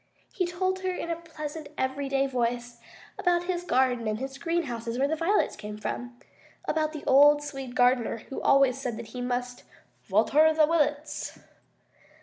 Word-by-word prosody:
He 365 -2 0
told 370 +2 -1
her 375 0 -2
in 350 -2 -3
a - - 0
pleasant 315 -2 -7
everyday 270 +1 0
voice 240 -2 -2 0.4
about 350 -1 +2
his 355 -1 -2
garden 250 -7 +1
and 215 0 -1
his 270 +2 -6
greenhouses 245 -9 -2
where 275 +2 +2
the 315 - 0
violets 340 +6 +1
came 210 0 -7
from 245 +3 -5 0.5
about 310 -1 0
the 305 -2 -8
old 290 +2 +6
Swede 270 -4 -7
gardener 245 -2 +3
who 270 - -5
always 275 -1 +4
said 240 -4 -3
he 235 +2 -7
must 245 0 -3 0.4
"vater 285 - +4
the 315 - +3
wi 330 +2 +1
lets." 295 +1 -2
275 Hz, 160 wpm, -27 LUFS, 245-315 Hz, 0.5 s, old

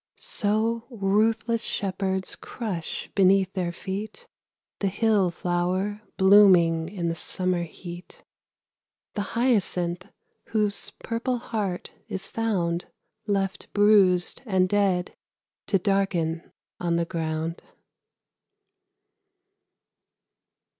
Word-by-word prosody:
So 225 +2 0
ruthless 220 +1 +1
shepherds 190 -1 0
crush 195 -9 -5
beneath 195 0 +4
their 180 -3 -1
feet 200 +4 -6 0.5
The 200 - 0
hill 200 -1 +2
flower 180 +4 -1 0.2
blooming 185 -5 +6
in 180 -3 -3
the 165 - 0
summer 180 +1 -1
heat; 175 +1 -11 0.9
The 205 - -2 0.2
hyacinth 185 -7 +1 0.4
whose 210 -2 0
purple 235 +2 -1
heart 205 -6 -3 0.2
is 195 0 -5
found 180 -7 -1 0.4
Left 195 0 -1
bruised 200 -4 +4
and 185 -3 +3
dead, 190 -2 +1 0.5
to 195 - +3
darken 180 -4 0 0.3
on 170 -1 0
the 170 0 +1
ground. 165 -1 -3
190 Hz, 90 wpm, -26 LUFS, 175-210 Hz, 0.9 s, blooming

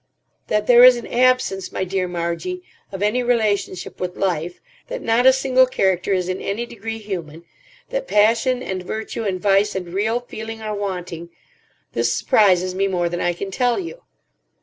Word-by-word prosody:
"That 210 0 0
there 245 +1 +7
is 250 -1 +9
an 235 - -7
absence, 250 -6 +1
my - - -2
dear 185 0 -1
Margie, 175 - -4 0.3
of 195 0 -4
any 215 +5 +1
relationship 215 -6 -1
with 180 0 -4
life, 175 -2 -2 0.3
that - - -5
not 235 +3 +3
a - - +10
single 260 -1 +3
character 190 -6 0
is 185 -2 +1
in 185 0 -3
any 215 +4 -3
degree 225 -1 -6
human, 170 -7 -6 0.5
that - - -3
passion 230 +4 +2
and 190 -5 -4
virtue 220 +4 -5
and 190 -2 -1
vice 200 +1 +2
and 180 -2 -5
real 220 +5 0
feeling 225 -2 -8
are 215 -1 -4
wanting—this 175 - -5
surprises 185 -3 +3
me 195 +1 0
more 175 -3 0
than 175 0 -3
I 175 - +1
can 195 +3 -6
tell 245 +4 +1
you. 390 +7 -6
205 Hz, 170 wpm, -21 LUFS, 185-240 Hz, 0.5 s, a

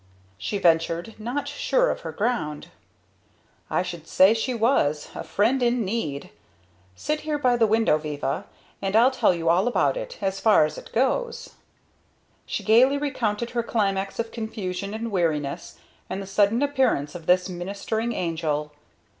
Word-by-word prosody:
she 200 - -2
ventured, 170 +2 +1
not 245 +6 -3
sure - - +1
of - - -4
her - - -6
ground. 205 -10 -2 1.0
"I - - +1
should 175 -3 -7
say 190 +3 +5
she 230 +3 -1
was! 225 - +1
A - - -6
friend 245 +6 +1
in 240 -2 +1
need! 185 -9 -3 0.6
Sit 300 - -2
here 305 -1 -2
by 250 -4 +2
the 230 -2 +3
window, 220 -7 +3
Viva 145 -3 -3 0.4
and 195 +1 -1
I'll 240 +4 +6
tell 260 - +3
you 165 -1 -4
all 175 +6 +3
about 245 - +2
it - - -6
as 195 -1 -2
far 215 -8 +5
as 155 - -5
it - - -14
goes." 465 - -1 1.0
She - - -3
gaily 250 +6 +5
recounted 240 -6 -2
her 240 - 0
climax 195 -4 -1
of 230 -1 -3
confusion 200 -3 -4
and 225 +1 -4
weariness, 155 -7 -1 0.3
and - - -3
the 195 - -6
sudden 205 +6 +2
appearance 260 - +1
of 170 -2 -9
this 180 0 +4
ministering 200 +5 -3
angel. 155 -3 -2
210 Hz, 160 wpm, -25 LUFS, 175-240 Hz, 1.0 s, I'll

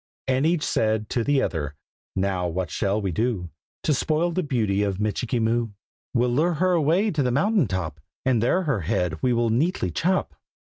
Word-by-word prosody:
And 135 +3 +2
each 170 -2 +1
said 110 -1 0
to 120 - 0
the 140 +1 +2
other 75 -3 -3 0.4
"Now 95 -2 0
what 85 -1 -3
shall 100 +3 0
we 100 -3 -2
do 95 -3 -1 0.3
To 155 - +2
spoil 155 +5 +1
the 185 - 0
beauty 110 - 0
of 100 -2 -1
Michikee 110 +3 -1
Moo?" 115 +1 +1 0.5
"We'll 120 0 +3
lure 160 +7 +2
her 185 +4 +2
away 175 +6 +2
to 155 -4 0
the 125 - +1
mountain 160 - +2
top, 85 -5 -3 0.3
And 125 -4 +3
there 180 +11 +2
her 140 - 0
head 85 -3 -1
we 125 - +2
will 120 -1 +2
neatly 125 - +1
chop!" 180 - 0
120 Hz, 190 wpm, -24 LUFS, 100-150 Hz, 0.5 s, We'll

